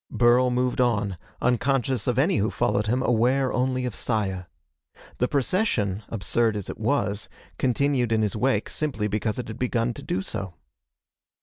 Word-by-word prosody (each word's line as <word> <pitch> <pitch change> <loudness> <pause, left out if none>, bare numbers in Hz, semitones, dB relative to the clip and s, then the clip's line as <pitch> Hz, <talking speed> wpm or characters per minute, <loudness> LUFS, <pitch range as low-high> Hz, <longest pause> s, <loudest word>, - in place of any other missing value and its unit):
Burl 125 +1 +4
moved 125 0 +1
on, 105 -5 +1 0.3
unconscious 125 -1 +1
of 125 -1 +1
any 165 +8 +3
who 105 +2 +1
followed 115 -4 0
him, 125 +4 +1
aware 125 +3 +2
only 130 0 0
of 125 - -3
Saya. 95 -6 -2 0.7
The 125 - +2
procession, 130 - 0
absurd 110 +1 0
as 100 - -5
it - - -11
was, 110 -4 -1 0.3
continued 130 -1 +1
in 110 -1 +2
his 105 - -1
wake 130 +5 +1
simply 130 -9 -2
because 105 +1 -1
it 125 - -4
had 110 +1 -7
begun 120 -1 0
to - - -9
do 95 - -2
so. 95 -3 -5
120 Hz, 165 wpm, -25 LUFS, 105-130 Hz, 0.7 s, Burl